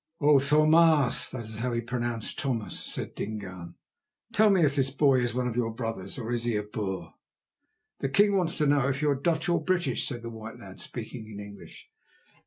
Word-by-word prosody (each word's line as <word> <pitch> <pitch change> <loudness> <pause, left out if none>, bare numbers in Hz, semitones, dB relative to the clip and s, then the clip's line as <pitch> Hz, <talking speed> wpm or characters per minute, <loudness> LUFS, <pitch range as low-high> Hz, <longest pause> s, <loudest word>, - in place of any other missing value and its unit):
"O 145 -1 +6
Tho 150 +3 +4
maas" 155 -4 +4
(that 120 -3 -6
is 110 0 -6
how 125 +3 -1
he 120 - 0
pronounced 120 -1 -3
"Thomas"), 120 -6 -2
said - - -5
Dingaan, 95 -5 -6 0.6
"tell 215 +1 +5
me 185 -5 +4
if 140 -1 +1
this 135 -2 +2
boy 135 -1 +3
is 120 -1 -1
one 125 0 0
of 120 - -3
your 120 -2 0
brothers, 115 -4 -4
or 120 -2 -4
is 120 -1 -1
he 120 -2 0
a 105 - 0
Boer?" 105 -3 -5 0.9
"The 135 - -1
king 205 +7 +4
wants 175 -3 +1
to 150 - +2
know 140 -2 +3
if 140 +2 -1
you 150 - +3
are - - +2
Dutch 160 +3 0
or 170 -2 +1
British," 180 0 0
said 120 -3 -5
the 115 - -6
white 110 0 -8
lad, 95 -1 -11
speaking 110 -1 -7
in 105 -2 -8
English. 100 0 -11
125 Hz, 210 wpm, -28 LUFS, 110-150 Hz, 0.9 s, O